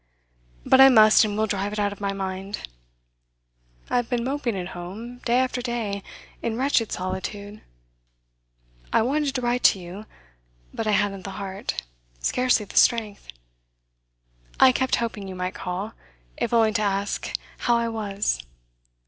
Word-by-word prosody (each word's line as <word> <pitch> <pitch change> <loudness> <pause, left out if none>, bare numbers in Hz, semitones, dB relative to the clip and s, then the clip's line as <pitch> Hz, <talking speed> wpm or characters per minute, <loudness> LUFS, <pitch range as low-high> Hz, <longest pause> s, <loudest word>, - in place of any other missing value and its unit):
But 260 - +6
I 270 - +10
must 215 -3 +7
and 205 -1 -3
will 220 - +2
drive 205 -1 -2
it - - -4
out 205 -1 0
of 205 - -15
my 200 -1 0
mind. 195 +1 -5 1.2
I - - +1
have 245 -1 -1
been 245 -2 0
moping 260 -5 -2
at 180 0 -4
home, 210 +9 -8
day 240 +1 +3
after 255 -1 0
day, 230 -5 -3 0.4
in 225 -1 -2
wretched 255 -4 +1
solitude. 200 +3 -5 1.3
I - - +4
wanted 280 +2 0
to 255 - 0
write 245 +1 0
to 195 - +6
you, 185 +5 -9 0.7
but 225 - -3
I 210 - +2
hadn't 200 -1 +1
the 195 - -6
heart 195 - -4 0.4
scarcely 250 - +2
the - - -8
strength. 225 -4 +3 1.3
I 265 - +8
kept 260 +1 +1
hoping 220 -4 -3
you 190 - -7
might 180 0 -3
call 190 +4 -4 0.4
if - - -2
only 225 -2 +4
to 215 - +1
ask 200 0 -1 0.3
how 240 -1 +2
I 235 0 0
was. 205 - -2
215 Hz, 155 wpm, -24 LUFS, 195-240 Hz, 1.3 s, I